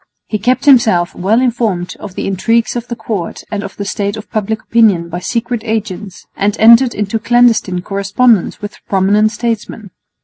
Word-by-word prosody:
He 215 - -3
kept 250 +6 0
himself 220 -11 +4
well 205 +6 +1
informed 225 -8 -1
of 185 - -9
the - - -4
intrigues 225 +6 0
of 240 0 -4
the 235 - -4
court 200 -8 -5
and 210 -2 -2
of 195 - -8
the 200 - -4
state 200 +1 -3
of 215 - -10
public 220 -1 -2
opinion 205 -8 +2
by 175 +1 -4
secret 235 +4 -3
agents, 210 -4 -4
and 205 +1 -1
entered 235 +3 +6
into 210 +2 -2
clandestine 225 -6 +2
correspondence 200 +3 +1
with 205 - -7
prominent 205 +3 +2
statesmen. 225 -3 -4
215 Hz, 170 wpm, -14 LUFS, 195-230 Hz, -, entered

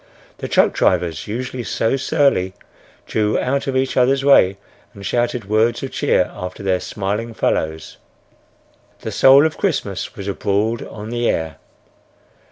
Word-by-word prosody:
The - - -4
truck - - +3
drivers, 80 -3 0
usually 125 +3 -4
so 115 +1 0
surly, 135 - +1 0.5
drew 105 -1 0
out 140 +2 -1
of 130 -1 0
each 130 0 0
others' 135 +2 +2
way 100 -9 +5 0.4
and 100 -1 -10
shouted 120 +1 -1
words 110 +3 +1
of - - -4
cheer - - +1
after 90 +2 -7
their 95 -2 +1
smiling 105 +5 -4
fellows. 80 -5 -2 1.0
The - - -5
soul 135 +3 +6
of 160 - -2
Christmas 110 - -2
was 100 -3 -7
abroad 100 +3 -1
on 110 +1 -8
the 120 0 0
air. 80 -2 -2
110 Hz, 145 wpm, -19 LUFS, 95-130 Hz, 1.0 s, soul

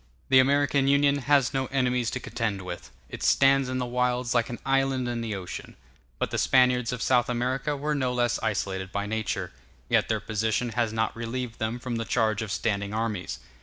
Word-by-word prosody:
The 130 - +7
American 140 +1 +3
Union 140 0 +4
has 140 -1 +2
no 135 -1 0
enemies 125 -3 0
to - - -3
contend 115 -5 -3
with; 90 -1 -7 0.2
it - - -9
stands 135 -1 +4
in 130 - -2
the 125 - -1
wilds 125 0 0
like 120 -2 +1
an 120 - -5
island 135 -2 +1
in 120 -1 -2
the 110 -3 -3
ocean. 90 -2 -7 0.4
But - - -2
the - - -1
Spaniards 125 -2 +3
of 125 -2 -3
South 125 -2 +3
America 130 +4 -1
were 150 +2 -1
no 130 -3 0
less 120 -1 +1
isolated 95 -3 -2
by 100 0 -2
nature; 110 0 -2 0.4
yet - - +3
their - - +1
position 110 +3 -1
has 115 0 0
not 110 0 -1
relieved 115 +1 -4
them 110 +1 -1
from 125 -1 -4
the 115 - -3
charge 110 -2 +1
of 110 -3 -4
standing 100 -1 -1
armies. 110 -4 -2
120 Hz, 200 wpm, -27 LUFS, 110-130 Hz, 0.4 s, The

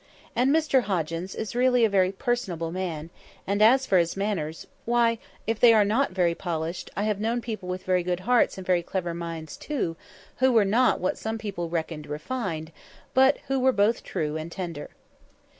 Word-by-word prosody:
And 250 +2 +3
Mr 300 -3 +3
Hoggins 170 0 -2
is 220 - -4
really 250 -1 +4
a - - +4
very 190 -2 +2
personable 190 -7 -2
man; 170 -3 -4 0.3
and 200 +2 0
as 260 +5 +6
for 185 - +4
his 170 +2 0
manners, 180 -6 -2 0.2
why, 235 -1 +2 0.3
if 225 0 -1
they 230 -2 +7
are 210 -1 +5
not 230 +7 +2
very 180 -2 +1
polished, 170 0 -4
I 200 - 0
have 210 -2 0
known 230 +3 0
people 215 -6 -6
with 185 0 -4
very 185 -1 +2
good 180 0 -2
hearts 245 +1 +2
and 190 - -7
very 180 -1 +2
clever 175 0 -3
minds 165 -2 -6
too, 255 - -3 0.4
who 260 0 +4
were 220 -3 +5
not 235 +6 +3
what 185 - -1
some 220 0 -3
people 195 -6 -4
reckoned 160 -2 -3
refined, 160 - -4 0.4
but 265 +2 +5
who 270 0 +1
were 260 +1 +4
both 210 0 +2
true 150 0 -2
and 160 +2 -6
tender." 170 -5 -5
195 Hz, 190 wpm, -26 LUFS, 170-235 Hz, 0.4 s, they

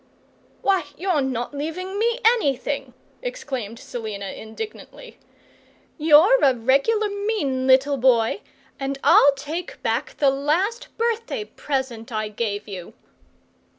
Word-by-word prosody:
"Why, 390 -1 +2
you're 360 -4 +1
not 255 -1 -2
leaving 360 +7 -4
me 470 +2 +2
anything!" 280 - +1 0.3
exclaimed 275 - -5
Selina, 215 -5 -6
indignantly. 435 - -9 0.8
"You're 325 +10 +6
a 265 -2 +5
regular 275 - +2
mean 400 -11 -1
little 270 +2 +4
boy, 245 - +3 0.4
and 275 0 -2
I'll 285 - +7
take 305 +6 -6
back - - -1
the 280 -2 +4
last 350 - 0
birthday 460 -1 -1
present 260 - -4
I 215 -1 -2
gave 210 -1 -3
you!" 185 -4 -8
280 Hz, 115 wpm, -23 LUFS, 245-400 Hz, 0.8 s, I'll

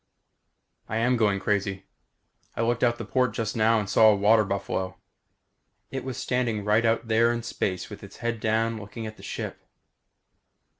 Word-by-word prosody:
I 110 - -1
am 125 +2 +2
going 105 -4 +2
crazy. 100 -1 -1 0.7
I - - 0
looked 120 +1 0
out 120 -1 +3
the 115 - -6
port 125 +3 +1
just 110 -2 -2
now 115 0 +4
and 105 - -3
saw 110 +3 +6
a 105 - +5
water 105 +2 +4
buffalo. 95 -1 -3 0.9
It 135 - -4
was 130 -3 -5
standing 115 -5 -1
right 110 +2 +3
out 115 +1 +1
there 115 +1 +4
in 120 -1 -3
space 95 -5 -2
with - - -9
its - - -11
head 115 -1 -2
down 110 +1 0
looking 110 +2 -7
at 110 0 -7
the - - -14
ship! - - -5
110 Hz, 180 wpm, -26 LUFS, 105-115 Hz, 0.9 s, saw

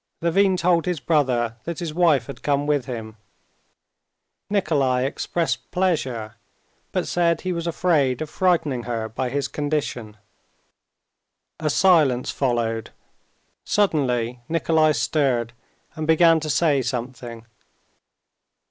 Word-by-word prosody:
Levin 185 +3 +2
told 175 -1 +2
his 180 -4 -1
brother 125 -7 +1
that 170 -1 -4
his 165 -3 -4
wife 155 -7 +3
had 140 - -9
come 145 0 0
with 145 -4 0
him. 110 -3 -7 1.3
Nikolay 140 -10 +1
expressed 165 +4 -2
pleasure, 130 - -1 0.5
but - - -1
said 170 -1 +1
he 185 -1 -2
was 170 0 -3
afraid 155 -7 +1
of 155 - -3
frightening 155 -8 0
her 115 -2 -3
by 125 +3 -3
his 140 +2 -1
condition. 145 -7 -3 1.4
A 155 -1 -1
silence 150 -7 +3
followed. 115 -4 -1 0.7
Suddenly 125 - 0
Nikolay 160 -1 +2
stirred, 120 -2 0 0.4
and 155 0 -5
began 165 0 +5
to 155 0 -5
say 150 -2 +2
something. 120 -2 -5
145 Hz, 115 wpm, -23 LUFS, 125-170 Hz, 1.4 s, began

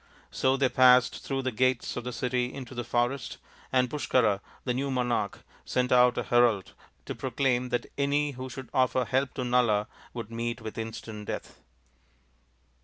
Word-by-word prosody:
So 130 +1 +2
they 135 -1 +3
passed 125 -1 +5
through 135 -1 -2
the 130 - -1
gates 130 +1 +1
of 120 - -4
the 125 - -3
city 125 0 -1
into 130 -2 -8
the 120 -1 -3
forest, 120 +2 -1 0.3
and 130 -1 +3
Pushkara, 125 -7 +1 0.2
the 125 - 0
new 135 +3 -1
monai^h, 120 -6 0 0.3
sent 125 0 0
out 125 -1 +5
a - - 0
herald 120 -5 +2 0.3
to - - -4
proclaim 125 -1 0
that 120 - -1
any 145 +1 +1
who 130 0 -7
should 130 0 -9
offer 130 -1 +2
help 130 +1 0
to 130 - -2
Nala 120 -4 +2 0.3
would 115 -2 -6
meet 115 +1 -3
with 110 0 -7
ii^ant 110 -2 -6
death. - - -6
125 Hz, 170 wpm, -28 LUFS, 120-130 Hz, 0.3 s, passed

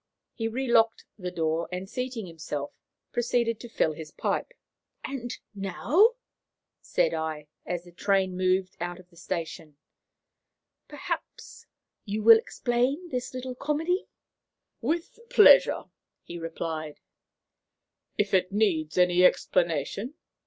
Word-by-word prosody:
He 225 -2 -2
relocked 230 -1 +2
the 180 -1 -3
door, 165 -1 -1
and, 180 +1 -4
seating 250 -1 -4
himself, 155 -4 -5 0.4
proceeded 235 -1 0
to 240 - -9
fill 160 -8 +1
his 155 0 -8
pipe. - - -2 0.5
"And 245 -3 -5 0.2
now," 275 - +3 0.7
said - - +1
I, 155 -2 -3 0.2
as 175 -1 -2
the 175 - -15
train 190 +1 +1
moved 185 0 +1
out 175 +1 -4
of 180 0 -17
the - - -21
station, 165 -3 -5 1.1
"perhaps - - -6 0.4
you 210 0 -3
will 225 0 +9
explain 250 +9 -1
this 250 -1 -4
little 255 0 -4
comedy." 315 +8 -1 0.7
"With 325 - -2
pleasure," - - +7 0.4
he 175 - -8
replied, 160 -2 -5 1.2
"if 205 -1 0
it 185 0 +3
needs 185 -7 +1
any 180 0 +4
explanation. 180 - +1
195 Hz, 115 wpm, -27 LUFS, 170-245 Hz, 1.2 s, will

